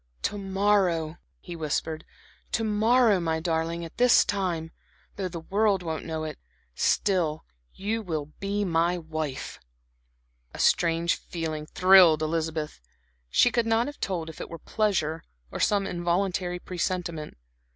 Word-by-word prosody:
"To 205 - -1
morrow," 190 -5 +1 0.2
he 175 - -8
whispered, 160 0 -2 0.5
"to 225 - +1
morrow, 220 0 +4
my 160 -2 -1
darling, 165 0 -1
at 165 - -12
this 250 0 +6
time 175 -5 -2 0.4
though 195 -2 -2
the 170 -2 -6
world 200 +1 +1
won't 160 -2 -4
know 160 -1 -3
it 155 -1 -6 0.3
still 165 - +1 0.3
you 215 +4 -2
will 160 -7 -3
be 200 +1 -1
my 170 0 +1
wife." 155 -4 -5 1.0
A - - -7
strange 170 0 +3
feeling 155 -3 -5
thrilled 180 -4 +6
Elizabeth. 155 - -2 0.5
She 245 - +4
could 235 -1 +1
not 225 +1 +3
have 290 0 -7
told 175 -4 -2
if 160 - -8
it - - -6
were 165 - -7
pleasure, 165 -4 -1 0.3
or - - -5
some 200 -1 +2
involuntary 180 0 -1
presentiment. 175 - -4
175 Hz, 140 wpm, -27 LUFS, 160-195 Hz, 1.0 s, this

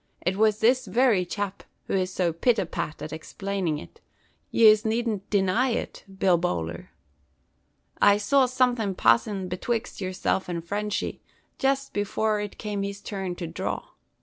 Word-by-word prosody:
It 180 +2 +1
was 215 +1 +2
this 250 +3 +3
very 235 -7 +3
chap 200 0 -3 0.2
who - - -4
is 185 -1 +1
so 175 -3 0
pit 230 +8 +2
a 195 - 0
pat 155 -2 -4
at 155 - -6
explainin' 185 0 -3
it. 85 - -12 0.5
Yez 215 -1 +6
needn't 220 -3 -1
deny 205 +6 +2
it, 235 - -3
Bill 185 -3 +3
Bowler. 85 - -3 1.1
I 205 0 +6
saw 260 +5 +3
somethin' 245 -6 +1
passin' 190 - +2
betwixt 210 +5 -3
yerself 185 0 -1
and 170 -1 -4
Frenchy, 210 +2 -2 0.4
jest 275 0 0
before 210 +1 0
it 205 -1 -5
come 205 -2 -3
his 200 0 -4
turn 195 -3 -4
to 175 -1 -5
dhraw. - - -4
200 Hz, 150 wpm, -26 LUFS, 185-220 Hz, 1.1 s, Yez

